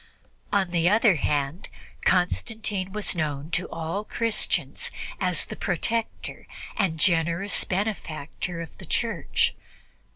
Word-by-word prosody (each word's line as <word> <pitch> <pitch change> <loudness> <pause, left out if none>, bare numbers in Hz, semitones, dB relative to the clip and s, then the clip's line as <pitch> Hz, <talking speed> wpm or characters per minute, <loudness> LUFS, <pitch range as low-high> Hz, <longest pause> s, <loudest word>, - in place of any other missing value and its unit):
On 195 -3 +2
the 170 0 +3
other 215 0 +6
hand, 145 +3 -1 0.4
Constantine 195 +1 +1
was 210 +1 +2
known 150 -1 -2
to 175 +2 0
all 165 +5 -3
Christians 230 0 0 0.3
as - - +3
the - - -7
protector 230 -1 -2 0.3
and 165 -5 +1
generous 170 +3 +3
benefactor 180 -4 -3
of 165 - -8
the - - -8
Church. - - +1
180 Hz, 110 wpm, -26 LUFS, 160-205 Hz, 0.4 s, other